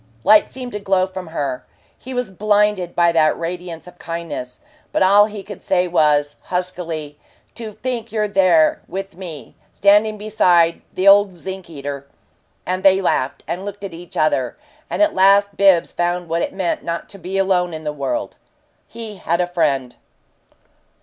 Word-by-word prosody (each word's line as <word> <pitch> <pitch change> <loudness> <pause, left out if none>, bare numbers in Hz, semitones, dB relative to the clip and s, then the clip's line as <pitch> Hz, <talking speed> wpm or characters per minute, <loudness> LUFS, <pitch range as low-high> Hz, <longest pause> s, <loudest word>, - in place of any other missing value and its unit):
Light 210 +1 +5
seemed 255 -1 -7
to 210 - -4
glow 190 -2 +2
from 185 -1 -8
her; 140 -5 -3 0.3
he 260 - -11
was 250 -5 -3
blinded 205 -2 +1
by 170 -1 +4
that 155 -2 +3
radiance 170 -1 -5
of 180 - -15
kindness. 165 -7 -6 0.3
But - - +2
all 200 +2 +6
he 210 -2 -8
could 205 +1 -10
say 180 -2 +1
was, 150 -4 +2
huskily, 170 -5 -4 0.3
"To 225 -2 -7
think 245 +1 -4
you're 215 -1 0
there 185 -6 +3
with 195 0 -6
me 170 -5 -9 0.2
standing 210 +2 +3
beside 180 -6 +2
the 185 +2 0
old 200 -1 +6
zinc 190 +1 -6
eater 140 -2 -6 0.3
" - - -43
And 185 +1 -2
they 190 0 +5
laughed 140 -8 -1
and 175 +4 -4
looked 205 0 -7
at 195 -3 -6
each 170 +1 -10
other, 135 -5 +1 0.3
and - - +2
at 315 - +2
last 200 +1 +4
Bibbs 195 -4 +4
found 175 0 -1
what 165 +1 -1
it - - -2
meant 185 -3 -2
not 170 0 -4
to 200 - -8
be 185 +2 -4
alone 185 -2 +1
in 160 -1 -7
the 150 -1 -3
world. 135 -4 -3 0.5
He 225 -3 -8
had 170 -1 -1
a 180 - +2
friend. 140 -8 -1
180 Hz, 175 wpm, -20 LUFS, 165-200 Hz, 0.5 s, all